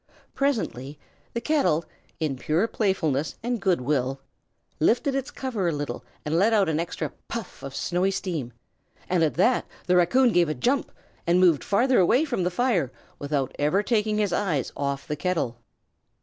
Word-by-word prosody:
Presently 180 - -1 0.4
the 235 - -2
kettle, 255 - +2 0.3
in 155 -4 -1
pure 160 - +1
playfulness 165 - 0
and 240 -2 -1
good 180 -7 +2
will, 135 0 0 0.6
lifted 245 - +2
its 270 +1 -2
cover 255 -10 -2
a - - +2
little 145 -1 -4 0.2
and 155 +3 +1
let 220 +4 +4
out 205 -3 +4
an 155 0 0
extra 170 +1 -3 0.2
puff 230 -5 -6
of 135 0 -7
snowy 180 +2 0
steam; 170 -10 -3 0.6
and 180 -2 +1
at 155 - +1
that 240 +8 +2 0.2
the 180 - +3
raccoon 235 +9 +4
gave 175 -4 +3
a 155 - -1
jump, 255 - 0 0.4
and 175 +1 +4
moved 175 -6 +4
farther 245 +6 +3
away 240 - +4
from 245 -10 -2
the 180 - +1
fire, 180 - +1 0.3
without 140 -2 -2
ever 150 +8 +2
taking 215 -2 +1
his 205 -4 +1
eyes 165 - 0
off 140 0 -3
the 150 - -2
kettle. 150 -9 -1
180 Hz, 170 wpm, -25 LUFS, 150-225 Hz, 0.6 s, let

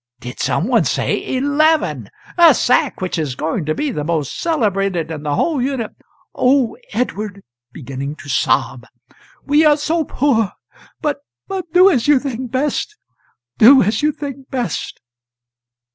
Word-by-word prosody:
did 125 0 -9
some 170 - 0
one 245 -3 +3
say - - -1
eleven? 305 +4 +1 0.3
a 335 -5 +7
sack 250 - +1
which 185 -2 -2
is 145 -5 -3
going 160 +4 -2
to 155 +1 -1
be 295 -2 -2
the 150 - -3
most 155 -3 -2
celebrated 195 - -1
in 155 -2 -5
the 145 -1 -2
whole 300 - 0
Uni 260 -3 -1 0.3
"] - - -38
"Oh, 255 -2 +2 0.2
Edward" 210 -5 -3 0.3
(beginning 140 +1 -6
to 155 - -13
sob), 125 -1 0 0.6
"we 295 +2 +3
are 300 -1 +5
so 320 +2 0
poor! 245 -8 0 0.5
but 295 -2 -1 0.3
but 375 -4 -5
do 365 +2 +6
as 250 -7 0
you 295 -1 +6
think 255 -2 -4
best 290 - -2 0.6
do 260 +4 +8
as 210 +4 0
you 300 +1 +2
think 275 -2 -8
best." 245 - -4
250 Hz, 155 wpm, -18 LUFS, -, 0.6 s, do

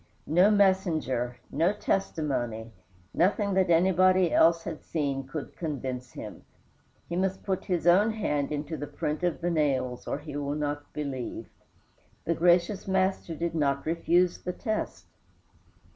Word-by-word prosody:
No 180 +6 +4
messenger, 170 - +1
no 165 +7 +2
testimony, 130 - -2 0.4
nothing 200 +3 +2
that 190 -1 +2
anybody 185 +1 +4
else 165 0 +5
had 165 -2 -6
seen 140 -4 -2
could 140 +2 -6
convince 130 -6 -4
him. - - -9 0.6
He 170 - -4
must 190 +1 -1
put 190 -2 -2
his 180 -3 -1
own 190 +5 +5
hand 150 -10 -1
into 150 +2 -3
the 145 - -5
print 150 +2 -3
of 175 -2 -1
the 175 +1 0
nails 130 -6 0
or - - -1
he 145 -1 -9
will 145 0 -2
not 145 -1 -3
believe. 140 -5 -5 0.8
The 170 - +1
gracious 175 +4 +2
Master 190 -3 0
did 170 +2 -2
not 140 -3 0
refuse 170 +2 +2
the 180 - -4
test. 220 0 -3
165 Hz, 145 wpm, -28 LUFS, 145-185 Hz, 0.8 s, else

